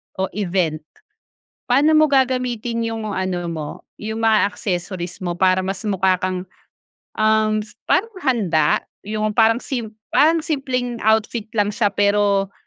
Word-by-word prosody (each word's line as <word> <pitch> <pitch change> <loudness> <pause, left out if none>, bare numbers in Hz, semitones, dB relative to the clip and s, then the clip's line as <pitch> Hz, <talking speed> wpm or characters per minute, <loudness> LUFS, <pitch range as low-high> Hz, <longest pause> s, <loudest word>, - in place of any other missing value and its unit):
o 190 0 -2
event, 180 -5 -1 0.9
paano 290 +5 +4
mo 310 - +6
gagamitin 250 -4 0
yung 225 -1 -3
mga 190 -2 -2
ano 185 -1 -2
mo, 155 -3 -4 0.3
yung 220 +1 -5
mga 220 -2 +3
accessories 180 -2 -4
mo 175 - -1
para 185 +1 +2
mas 190 0 -3
mukha 190 -3 +2
kang, 185 0 -2 0.7
um, 215 0 +2 0.2
parang 450 +3 +2
handa. 180 - +1 0.2
Yung 215 0 -1
parang 225 +1 +4
sim 240 -5 -3 0.2
parang 320 +1 +4
simpleng 255 -5 -2
outfit 220 +1 +1
lang 205 0 +2
siya 210 -1 +2
pero, 200 -1 +1
215 Hz, 135 wpm, -20 LUFS, 190-235 Hz, 0.9 s, mo